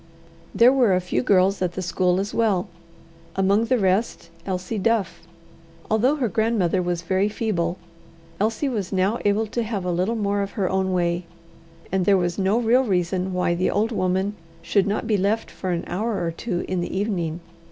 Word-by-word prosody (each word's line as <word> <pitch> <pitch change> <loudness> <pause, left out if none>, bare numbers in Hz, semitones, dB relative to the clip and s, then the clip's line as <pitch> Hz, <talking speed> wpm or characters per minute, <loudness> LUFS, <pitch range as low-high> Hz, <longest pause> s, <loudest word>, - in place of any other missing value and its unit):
There 245 +3 +6
were 240 -8 +4
a - - +2
few 180 0 -1
girls 195 -4 +3
at 180 -1 0
the 190 - -4
school 180 +1 +1
as 200 +1 -3
well 210 -6 +1 0.7
among 200 +3 +2
the 255 +2 +2
rest, 195 -2 0 0.2
Elsie 185 +3 -3
Duff. 215 -3 0 0.7
Although 245 +7 +3
her 265 -5 0
grandmother 210 -4 +1
was 175 -1 -2
very 190 +4 +1
feeble, 185 -6 -1 0.6
Elsie 220 +7 0
was 210 -8 -3
now 195 +4 +1
able 205 +2 +2
to 225 +3 -3
have 210 -4 -3
a 180 - 0
little 185 +7 0
more 205 -2 0
of 200 0 -4
her 195 -4 0
own 190 0 0
way, 175 -1 0 0.7
and 190 -1 +1
there 200 -1 +6
was 175 0 -1
no 195 +3 +2
real 240 +2 +3
reason 185 -3 0
why 180 -1 +1
the 180 +2 0
old 220 +3 0
woman 190 -1 0 0.3
should 200 +3 +2
not 205 +3 -1
be 220 -2 +1
left 205 +4 0
for 185 - -5
an 175 -1 -1
hour 205 -1 -2
or 165 - -1
two 175 +1 -3
in 185 -1 -1
the 180 - -3
evening. 175 -6 -2
195 Hz, 190 wpm, -23 LUFS, 180-220 Hz, 0.7 s, There